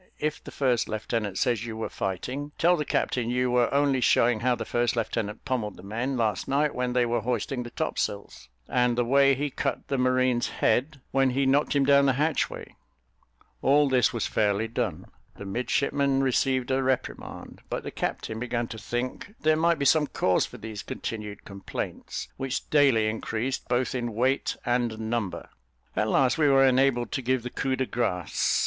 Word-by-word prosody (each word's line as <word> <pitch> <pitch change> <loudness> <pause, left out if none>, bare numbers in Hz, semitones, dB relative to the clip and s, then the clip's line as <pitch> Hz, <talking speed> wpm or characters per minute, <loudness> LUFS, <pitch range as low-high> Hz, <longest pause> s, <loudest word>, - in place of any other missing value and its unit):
If 150 0 -3
the - - -9
first 125 -4 0
lieutenant 110 -2 -2
says 120 -3 +1
you 115 -2 -6
were 110 - -2
fighting, 130 +10 -4
tell 175 +1 +4
the 150 -3 -2
captain 120 -4 0
you 125 0 +1
were 120 -1 +3
only 140 -2 +2
showing 120 -1 +3
how 125 +2 +2
the 115 -1 -5
first 120 +1 0
lieutenant 110 -2 -3
pummelled 120 -6 -2
the 90 - -13
men 120 +7 -2
last 110 -5 0
night 145 +2 +1
when 125 0 -1
they 125 -1 +3
were 120 -1 0
hoisting 125 +2 -2
the 120 - -6
topsails, 100 - -3 0.2
and 125 -1 +1
the 120 - +2
way 140 +2 +5
he 145 +1 -2
cut - - -3
the 135 - 0
marine's 130 -1 +2
head, 140 +2 0
when 135 -1 +3
he 135 +2 +1
knocked 140 +2 +2
him 140 -1 +3
down 140 0 +5
the 135 - +4
hatchway." 150 +3 -1 0.9
All 145 +2 +4
this 130 -2 +3
was 115 - -2
fairly 105 +1 +1
done 110 - -3 0.3
the 100 - -9
midshipmen 135 +5 0
received 130 0 +1
a 130 0 +2
reprimand, 130 -1 -3
but - - -3
the - - -5
captain 110 0 -3
began 120 -1 -2
to 110 - -7
think 125 - -4
there 155 0 +4
might 170 +1 +2
be 140 - -1
some 150 +1 +4
cause 90 -8 +1
for - - -11
these 110 -2 -7
continued 105 -2 -6
complaints, 100 -1 -6
which 135 -1 -3
daily 135 -7 +4
increased 115 +3 -3
both 125 +1 0
in 120 -3 -3
weight 130 +4 +1
and 120 -2 0
number. 110 -3 -3 0.5
At - - +1
last 135 +4 +2
we 150 - +4
were 135 -1 +5
enabled 130 -2 +2
to 135 - -2
give 130 -1 0
the 125 - -5
coup 130 -1 -1
de 130 - -1
grace. 90 -10 0
125 Hz, 185 wpm, -27 LUFS, 115-135 Hz, 0.9 s, way